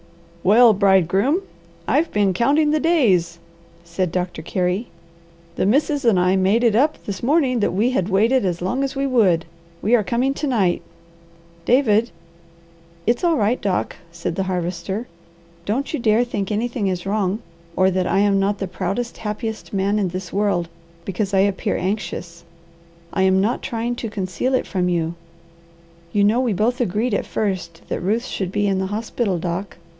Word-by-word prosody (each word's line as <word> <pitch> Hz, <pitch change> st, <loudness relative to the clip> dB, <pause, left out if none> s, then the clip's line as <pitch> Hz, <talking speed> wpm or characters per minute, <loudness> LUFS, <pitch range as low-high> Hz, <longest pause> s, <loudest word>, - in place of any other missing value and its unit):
"Well, 225 Hz, +4 st, +6 dB
bridegroom! 195 Hz, -, +3 dB, 0.4 s
I've 320 Hz, +3 st, +1 dB
been 205 Hz, -2 st, +2 dB
counting 290 Hz, -, +2 dB
the 310 Hz, -, +2 dB
days!" 220 Hz, -, +2 dB, 0.5 s
said 170 Hz, +1 st, -2 dB
Doctor 180 Hz, -2 st, -3 dB
Carey. 180 Hz, +6 st, -1 dB, 0.7 s
"The -, -, 0 dB
Missus 285 Hz, +5 st, +2 dB
and 225 Hz, -6 st, +4 dB
I 180 Hz, +1 st, +3 dB
made 195 Hz, +5 st, +2 dB
it 230 Hz, -3 st, +3 dB
up 295 Hz, +6 st, +1 dB
this 195 Hz, -2 st, -5 dB
morning 260 Hz, -2 st, +2 dB
that 205 Hz, -, +2 dB
we 215 Hz, +7 st, +1 dB
had 190 Hz, -7 st, 0 dB
waited 225 Hz, +6 st, +3 dB
as 175 Hz, -2 st, -2 dB
long 250 Hz, +9 st, 0 dB
as 275 Hz, +1 st, -3 dB
we 275 Hz, 0 st, 0 dB
would. 200 Hz, -11 st, +3 dB, 0.4 s
We 220 Hz, -, +1 dB
are 235 Hz, -3 st, +5 dB
coming 250 Hz, +6 st, 0 dB
to 295 Hz, -, -3 dB
night. 200 Hz, -9 st, +1 dB, 0.8 s
David." 235 Hz, -3 st, +3 dB, 1.0 s
"It's 235 Hz, -, +1 dB
all 335 Hz, -3 st, +3 dB
right, 220 Hz, +3 st, +1 dB
Doc," 195 Hz, -2 st, -1 dB
said 170 Hz, 0 st, -4 dB
the 195 Hz, -, -1 dB
Harvester. 180 Hz, +4 st, -3 dB, 0.6 s
"Don't 255 Hz, -, -2 dB
you 310 Hz, -, -1 dB
dare 225 Hz, 0 st, +3 dB
think 205 Hz, -5 st, -3 dB
anything 225 Hz, 0 st, -1 dB
is 180 Hz, -1 st, -2 dB
wrong 200 Hz, 0 st, -1 dB, 0.3 s
or 185 Hz, 0 st, +3 dB
that 185 Hz, 0 st, 0 dB
I -, -, +1 dB
am 200 Hz, 0 st, +3 dB
not 200 Hz, +1 st, +1 dB
the 195 Hz, -, -3 dB
proudest, 200 Hz, +7 st, -3 dB
happiest 220 Hz, +1 st, -5 dB
man 200 Hz, +1 st, +1 dB
in 195 Hz, -, +1 dB
this 180 Hz, 0 st, -6 dB
world, 200 Hz, -4 st, +1 dB, 0.4 s
because 195 Hz, +1 st, -2 dB
I 190 Hz, -, +5 dB
appear 200 Hz, -1 st, 0 dB
anxious. 180 Hz, -3 st, -4 dB, 0.7 s
I -, -, 0 dB
am 190 Hz, 0 st, +4 dB
not 215 Hz, +6 st, 0 dB
trying 235 Hz, +1 st, -2 dB
to 230 Hz, -, -4 dB
conceal 205 Hz, +6 st, -1 dB
it -, -, 0 dB
from 180 Hz, -2 st, -1 dB
you. 165 Hz, -1 st, 0 dB, 1.0 s
You 205 Hz, +2 st, +2 dB
know 215 Hz, +4 st, +3 dB
we 245 Hz, -4 st, 0 dB
both 240 Hz, +6 st, 0 dB
agreed 220 Hz, +2 st, 0 dB
at -, -, -1 dB
first 185 Hz, -5 st, -3 dB
that -, -, -2 dB
Ruth 220 Hz, +7 st, 0 dB
should 190 Hz, -7 st, -3 dB
be 205 Hz, +1 st, 0 dB
in 195 Hz, -1 st, +1 dB
the 190 Hz, -, -1 dB
hospital, 210 Hz, -1 st, -2 dB
Doc. 175 Hz, 0 st, -4 dB
205 Hz, 175 wpm, -21 LUFS, 185-240 Hz, 1.0 s, Well